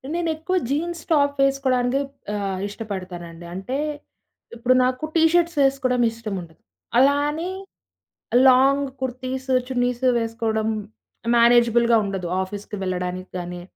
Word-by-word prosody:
నేనెక్కువ 335 +1 -1
jeans, 335 +3 -2
top 285 -2 +3
వేసుకోవడానికే 270 -1 +1 0.3
ఆహ్, 195 -2 -2
ఇష్టపడతానండి. 185 -5 -7
అంటే, 195 +9 -4 0.8
ఇప్పుడు 245 +2 +2
నాకు 255 +3 -1
టీ 325 - +4
షర్ట్స్ 340 -2 +2
వేసుకోవడం 265 -2 +2
ఇష్టముండదు. 195 -8 -7 0.4
అలా 275 +3 +5
అని 325 +4 -3 1.0
లాంగ్ 270 +2 +5
కుర్తీసు, 260 +1 -3
చున్నీసు 250 0 0
వేసుకోవడం 225 -1 -1 0.7
మేనేజబుల్‌గా 235 0 +5
ఉండదు. 190 -3 -3 0.2
ఆఫీస్‌కి 205 +2 -7
వెళ్ళడానికి 185 0 -3
గానీ 175 0 -6
245 Hz, 105 wpm, -23 LUFS, 200-275 Hz, 1.0 s, అలా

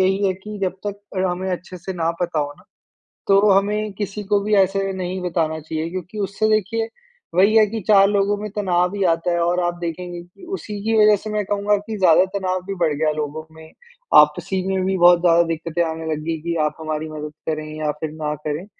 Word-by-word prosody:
यही 195 +2 +2
है 190 - +2
कि 210 +2 -9
जब 185 - +1
तक 205 0 -4 0.2
अ, - - +1
हमें 185 +1 -3
अच्छे 180 +1 -6
से 190 +3 -6
ना 165 -1 0
पता 170 -3 -1
हो 145 0 -3
ना - - -20 0.6
तो 200 +1 +5
हमें 210 +2 +1
किसी 205 +1 -4
को 205 +1 +2
भी 210 +1 -1
ऐसे 195 0 +2
नहीं 185 0 -4
बताना 165 -3 -1
चाहिए 160 +1 -4
क्योंकि 185 +3 -6
उससे 200 +2 0
देखिए 220 +2 +1 0.5
वही 200 +4 +4
है 215 - +7
कि 220 +1 -4
4 195 -2 +6
लोगों 205 0 +1
में 210 +1 -5
तनाव 180 -1 +1
ही 200 - 0
आता 165 +2 -2
है 170 - +1
और 175 +1 +1
आप 175 - 0
देखेंगे 175 +1 -5
कि 180 - -17
उसी 210 -2 -7
की 225 - +1
वजह 210 0 +6
से 215 - -5
मैं 210 -1 0
कहूँगा 205 +1 +1
कि 215 +2 -6
ज़्यादा 185 -2 +5
तनाव 185 -1 -1
भी 195 - -3
बढ़ 155 -2 +2
गया 155 +1 +1
लोगों 150 +1 -3
में। 160 0 -13 0.5
आपसी 175 +6 +2
में 190 -1 0
भी 190 0 0
बहुत 175 0 +6
ज़्यादा 170 -1 +5
दिक्कतें 165 +1 -2
आने 160 0 -4
लग 155 0 -2
गई 165 -1 -1
कि 170 0 -2
आप 150 - -2
हमारी 155 0 -3
मदद 150 0 -7 0.2
करें 155 0 -3
या 150 -1 0
फिर 155 -1 -3
ना 150 0 0
करें। 150 +5 -3
185 Hz, 225 wpm, -21 LUFS, 165-200 Hz, 0.6 s, है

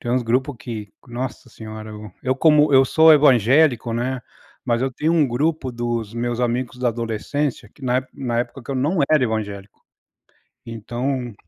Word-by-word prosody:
Tem 120 - -4
uns 125 0 +1
grupo 130 +5 0
que, 110 -4 -7
nossa 125 +1 -6
senhora, 110 -1 -9 0.3
eu 130 0 +1
como 150 0 +4
eu 135 0 +7
sou 160 +4 +6
evangélico, 130 -3 +4
né. 125 +2 -2 0.4
Mas 120 -1 0
eu 130 -1 -1
tenho 155 +6 0
um 155 -4 +3
grupo 135 +2 -1
dos 120 -2 -3
meus 120 0 -2
amigos 125 +1 -1
da 125 -1 +1
adolescência 115 +2 -3
que 145 - -22
na 130 +1 +1
na 120 -3 -2
época 130 +1 -6
que 130 - -9
eu - - -2
não 150 +8 0
era 155 -3 +4
evangélico. 105 -3 -4 0.9
Então, 120 +2 -4
125 Hz, 165 wpm, -21 LUFS, 115-135 Hz, 0.9 s, eu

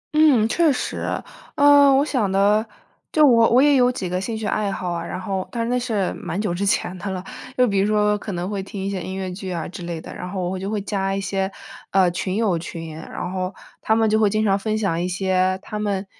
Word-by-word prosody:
嗯， 290 -8 +5
确 320 +6 +3
实。 255 - -3 0.6
呃， 285 -1 +7
我 275 +2 +4
想 235 -10 0
的， 205 +2 +3 0.5
就 305 -1 +5
我 230 -4 +5
我 245 - +5
也 290 -1 +5
有 250 -1 +4
几 195 -7 -4
个 180 +1 -2
兴 220 +3 -3
趣 220 - -5
爱 205 -1 0
好 180 -2 -3
啊， 170 -1 -3
然 175 - -5
后， 190 -1 -3
但 235 -1 -2
是 230 - -2
那 250 - +2
是 220 -6 -1
蛮 185 - -5
久 205 -4 -1
之 180 +3 -2
前 185 -2 0
的 200 - -4
了。 185 -1 -4 0.3
就 250 0 +4
比 200 -3 +1
如 200 - +2
说 210 -1 +2
可 205 -1 -6
能 175 +1 -3
会 200 -1 -3
听 195 +1 -8
一 - - -1
些 190 -2 -3
音 190 +2 -5
乐 190 -1 -4
剧 190 0 -6
啊 170 -3 -3
之 180 - -9
类 170 -1 -4
的， - - -9
然 180 - -6
后 185 -1 -3
我 175 - -2
会 190 - -3
就 195 +1 -4
会 215 0 -1
加 195 -1 -1
一 - - -1
些， 195 0 -2 0.4
呃， 185 -2 +3
群 185 +2 -3
友 205 -6 +1
群。 165 -1 -7
然 175 +3 -6
后 185 0 -2 0.3
他 220 - +2
们 225 0 +3
就 220 0 +2
会 215 -2 +4
经 215 +1 0
常 195 -1 +3
分 215 +2 -1
享 190 -6 0
一 180 - -1
些 185 0 +1
他 210 - -5
们 200 -2 -1
195 Hz, 280 characters per minute, -22 LUFS, 185-220 Hz, 0.6 s, 呃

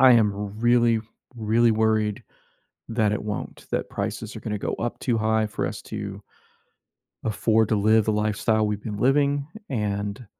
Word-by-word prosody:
I 130 -1 +8
am 110 -3 +4 0.3
really, 120 -1 +4 0.4
really 115 +1 +3
worried 110 -1 +1 0.7
that 110 -2 +2
it 105 - -1
won't, 105 -1 -5
that - - -1
prices - - -4
are - - -6
gonna 105 - -3
go - - -3
up 120 - -2
too 120 -3 0
high 110 0 +2
for 105 - -2
us 105 - -6
to 100 -2 -6 1.0
afford 110 0 +2
to 110 - +1
live 110 +1 +4
the 110 - +2
lifestyle 110 +1 +1
we've 105 -1 -2
been 105 -2 -5
living 140 +4 +2 0.2
and 105 -2 -2
110 Hz, 160 wpm, -25 LUFS, 105-115 Hz, 1.0 s, I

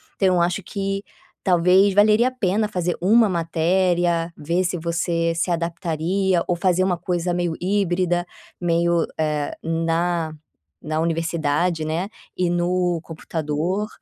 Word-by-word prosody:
Então 185 -2 +2
eu 175 - +3
acho 175 +3 0
que 195 +1 -3 0.4
talvez 185 +2 +4
valeria 215 +4 +5
a - - -15
pena 210 -3 0
fazer 180 -3 -2
uma 220 +5 +5
matéria, 170 0 +1
ver 170 +5 0
se 180 0 -1
você 165 0 -1
se 170 +2 0
adaptaria 170 +2 0
ou 175 - +1
fazer 185 +1 +2
uma 185 -2 +1
coisa 175 0 -1
meio 175 -1 -1
híbrida, 180 -2 +1 0.4
meio, 170 0 +2
eh, 150 -2 -1
na 165 0 0 0.5
na 155 0 -2
universidade, 165 0 0
né, 170 +6 -2 0.3
e 180 -1 +1
no 175 0 +1
computador, 165 +5 -3
175 Hz, 135 wpm, -22 LUFS, 165-185 Hz, 0.5 s, valeria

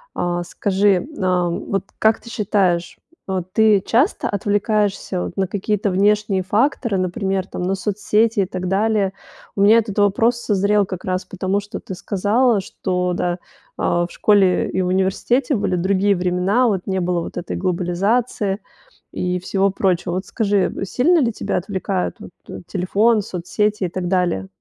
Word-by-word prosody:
Э, 175 0 -1
скажи, 195 0 +1
э, 180 -2 +1
вот 195 +3 -2 0.2
как 220 +1 +3
ты 235 - -12
считаешь, 195 -6 0 0.3
вот 185 -1 -3
ты 215 -1 +4
часто 265 - +1
отвлекаешься 205 -2 0
вот - - -5
на 190 -1 0
какие-то 205 +1 -1
внешние 200 0 +2
факторы, 220 0 +1
например 190 +1 -1
там, 180 - -6
на 190 +2 0
соцсети 210 +3 +1
и - - +1
так 185 0 -4
далее? 200 0 +1 0.5
У 195 - +1
меня 220 +3 +7
этот 210 -2 -3
вопрос 225 +4 +3
созрел 205 -2 +1
как 185 -1 -7
раз 185 0 -2
потому, 190 +1 -1
что 205 +2 -7
ты 190 - -7
сказала, 205 +4 +1
что, 180 -1 -2
да, 175 0 -1
э, - - -6 0.4
в 175 0 +1
школе 195 -4 +3
и 190 - 0
в 180 - 0
университете 195 +9 +1
были 200 -3 0
другие 195 +2 +2
времена, 180 +7 +1
вот 195 -4 -1
не 190 -1 0
было 175 0 0
вот - - -7
этой 175 - -4
глобализации, 195 +4 0 0.5
и 180 0 -2
всего 195 +2 0
прочего. 180 -3 0
Вот 185 +1 -3
скажи, 205 -4 0
э, 195 - -3
сильно 315 - +3
ли 240 -5 +2
тебя - - -2
отвлекают 190 0 -2
вот - - -11
т - - -8
телефон, 210 +4 +2
соцсети, 205 +3 -2
и - - -2
так 180 0 -4
далее? 175 - 0
195 Hz, 165 wpm, -20 LUFS, 185-210 Hz, 0.5 s, меня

